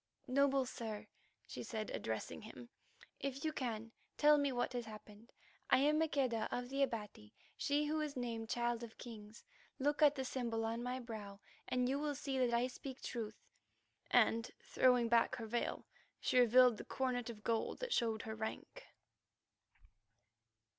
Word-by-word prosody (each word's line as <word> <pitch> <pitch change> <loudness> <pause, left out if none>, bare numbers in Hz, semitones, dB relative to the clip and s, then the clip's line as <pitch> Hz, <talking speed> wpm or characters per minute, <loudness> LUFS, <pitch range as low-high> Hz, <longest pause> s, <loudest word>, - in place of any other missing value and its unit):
"Noble 275 0 +3
sir," 225 -4 -5 0.4
she - - -7
said, 220 -2 -4
addressing 110 0 -3
him, 230 +2 -10 0.5
"if 275 +1 -3
you 310 - 0
can, 230 -4 -3 0.3
tell 300 0 +6
me 285 -1 +2
what 245 0 -1
has 240 -1 -2
happened. 215 +1 -12 0.4
I - - +7
am 300 +3 +4
Maqueda 265 -8 +1
of 245 0 -3
the 275 +1 -1
Abati, 210 - -3 0.2
she 290 +1 +1
who 310 +1 0
is 295 -3 -3
named 230 -2 -3
Child 240 -1 0
of 230 -2 -9
Kings. 220 -2 -10 0.3
Look 290 +2 +1
at 295 -1 +7
the 265 -2 -2
symbol 235 -3 -1
on 230 +1 -2
my 250 +1 -2
brow, 215 -5 -7 0.3
and 250 0 +1
you 275 +2 0
will 295 -1 -1
see 270 0 -2
that 250 -2 +3
I 235 +1 +3
speak 260 +1 -7
truth," 220 -3 -5 0.6
and, 230 +1 +4
throwing 250 -2 +4
back 230 0 +4
her 230 - -5
veil, 235 +2 -2 0.3
she 250 - +3
revealed 245 -1 +7
the - - -6
coronet 250 -2 -1
of 215 -2 -8
gold 230 -1 0
that - - -1
showed 225 -3 +1
her 220 - -4
rank. 220 - -6
245 Hz, 165 wpm, -37 LUFS, 225-270 Hz, 0.6 s, I